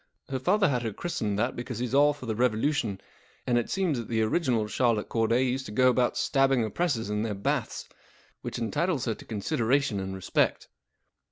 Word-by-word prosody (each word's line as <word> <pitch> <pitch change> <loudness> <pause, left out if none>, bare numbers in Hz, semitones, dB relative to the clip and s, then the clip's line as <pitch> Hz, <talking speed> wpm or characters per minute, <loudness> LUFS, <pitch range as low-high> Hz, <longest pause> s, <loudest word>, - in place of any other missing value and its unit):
Her 135 -1 -2
father 195 +9 +3
had 125 -5 0
her 110 -3 -3
christened 105 -9 -2
that 120 +4 0
because 125 -1 -5
he's 125 +1 -3
all 145 +2 +5
for 145 -3 -9
the 110 - -1
Revolution, 120 -2 0 0.5
and 125 - +1
it 120 - -4
seems 180 -9 0
that 115 - -6
the 110 -1 +1
original 120 -2 +1
Charlotte 115 0 0
Cordav 115 +2 +2
used 130 +1 -2
to - - -7
go 130 +4 +4
about 125 -1 +1
stabbing 135 -3 +2
oppressors 115 - -1
in 105 0 0
their 110 -2 -2
baths, 100 - -2 0.5
which - - -5
entitles 150 +6 -1
her 115 - 0
to - - -12
consideration 115 +2 0
and 95 0 -4
respect. 95 - 0
120 Hz, 190 wpm, -28 LUFS, 110-135 Hz, 0.5 s, all